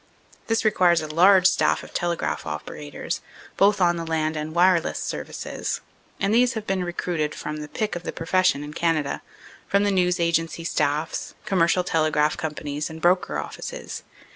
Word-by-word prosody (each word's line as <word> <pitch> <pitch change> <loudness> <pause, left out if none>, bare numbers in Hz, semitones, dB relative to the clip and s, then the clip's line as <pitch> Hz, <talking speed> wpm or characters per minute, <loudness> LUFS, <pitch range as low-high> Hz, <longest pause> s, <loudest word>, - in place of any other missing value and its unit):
This 225 0 +1
requires 180 -5 +4
a 155 - -5
large 185 +3 +6
staff 185 - +3
of - - -12
telegraph 175 -1 -2
operators, 75 -1 -5 0.3
both 200 +1 +4
on 175 -1 +3
the 165 - -3
land 160 -1 -1
and 155 +1 -4
wireless 175 -1 +3
services, - - -4 0.4
and 200 +1 +1
these 245 +1 +4
have 220 -2 -5
been 190 -2 0
recruited 175 -3 -2
from 150 0 -5
the 150 0 -6
pick 210 +6 -2
of 175 - -4
the - - -4
profession 165 -3 +1
in 150 +1 -8
Canada, 155 -4 0 0.5
from 200 +1 +3
the 205 - +2
news 180 -2 +2
agency 165 0 0
staffs, 150 0 -1
commercial 180 -1 +2
telegraph 155 -3 +2
companies 150 -1 -4
and 160 0 -8
broker 180 +2 +2
offices. - - -6
170 Hz, 165 wpm, -24 LUFS, 155-185 Hz, 0.5 s, large